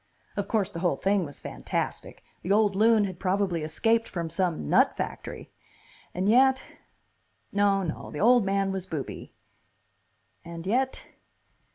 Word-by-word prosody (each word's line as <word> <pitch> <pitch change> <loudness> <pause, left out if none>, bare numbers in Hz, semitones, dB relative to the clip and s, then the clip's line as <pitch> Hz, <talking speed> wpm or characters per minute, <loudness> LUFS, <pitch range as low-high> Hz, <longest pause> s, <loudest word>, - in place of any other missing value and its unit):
Of 205 -1 -2
course, 205 -3 0
the 170 - -6
whole 175 0 +1
thing 195 -2 +1
was 145 - -8
fantastic; - - -4 0.2
the 180 - -3
old 205 -1 +3
loon 220 +1 +4
had 185 -3 -6
probably 185 -3 0
escaped 225 +9 +1
from 170 -3 -4
some 170 - -1
nut - - +3
factory.... - - -6 0.6
and 185 +2 -2
yet.... 265 +4 +4 0.9
No, 200 -1 +2
no, 165 -3 -5
the 150 - -6
old 240 +1 +5
man 195 0 0
was 190 -1 -4
booby. 150 -4 -6 1.1
And 170 0 -8
yet.... 260 +6 0
195 Hz, 145 wpm, -27 LUFS, 175-215 Hz, 1.1 s, old